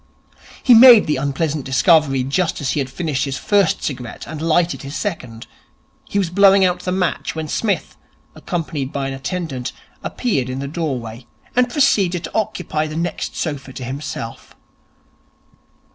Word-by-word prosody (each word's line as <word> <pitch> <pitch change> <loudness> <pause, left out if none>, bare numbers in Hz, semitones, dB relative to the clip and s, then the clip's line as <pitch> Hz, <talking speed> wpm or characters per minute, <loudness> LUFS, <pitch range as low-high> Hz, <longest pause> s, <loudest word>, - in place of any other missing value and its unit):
He 250 - +7
made 235 -1 +9
the 150 - 0
unpleasant 140 +2 -1
discovery 135 0 +3
just 155 +6 -1
as 140 -4 -1
he - - -1
had 135 -2 -2
finished 145 -2 -2
his 135 -1 -3
first 200 -5 +1
cigarette 125 -4 -5
and 155 +1 -7
lighted 165 +2 +1
his 140 +2 -7
second. 125 - -5 0.6
He - - -2
was 185 -4 0
blowing 195 0 +6
out 180 -1 +1
the 180 - -3
match 180 -3 -1
when 160 -1 -4
Psmith, 205 +6 -2 0.4
accompanied 155 -6 -4
by 135 -1 -2
an - - -4
attendant, 135 -2 -4 0.3
appeared 140 - -1
in 130 - -4
the 140 +1 -4
doorway, 130 -7 -4 0.3
and 250 0 +3
proceeded 195 - +2
to - - -7
occupy 175 -7 -1
the 155 - -7
next 170 +1 -3
sofa 140 -4 -4
to 130 - -7
himself. 125 -3 -6
155 Hz, 160 wpm, -19 LUFS, 135-180 Hz, 0.6 s, made